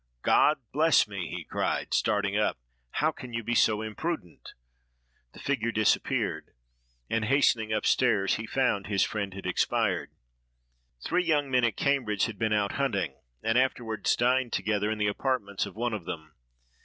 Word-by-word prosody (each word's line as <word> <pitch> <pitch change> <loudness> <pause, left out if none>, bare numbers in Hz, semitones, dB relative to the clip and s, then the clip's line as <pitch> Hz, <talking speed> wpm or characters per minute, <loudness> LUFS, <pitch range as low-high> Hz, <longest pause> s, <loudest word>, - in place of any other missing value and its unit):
"God - - +4
bless - - +4
me!" - - -5
he - - -5
cried, - - -2
starting 105 -2 +1
up, 105 0 +1 0.3
"how 155 - +1
can 125 -5 -10
you 115 0 -2
be 120 - -2
so 110 -1 +3
imprudent?" 110 - -5 0.8
The - - -13
figure 120 -5 -1
disappeared; 110 - 0 0.5
and, 115 -1 0
hastening 115 -3 +2
up 110 - 0
stairs, 105 -7 +2
he 110 0 -6
found 125 -8 0
his 100 -2 +2
friend 100 -2 -2
had 95 - -8
expired. - - 0 1.0
Three 180 +1 +1
young 145 -5 +1
men 125 -1 +3
at 115 -4 -1
Cambridge 125 -8 +1
had 110 -5 -6
been 110 -1 0
out 105 -1 +1
hunting, 100 - -1 0.2
and 115 +2 +3
afterward 120 -4 -1
dined 125 0 +2
together 105 -1 0
in 110 - -2
the 105 - 0
apartments 105 -2 -1
of - - -11
one 120 +1 -1
of 100 -6 -5
them. 80 -1 -7
110 Hz, 165 wpm, -28 LUFS, 105-130 Hz, 1.0 s, God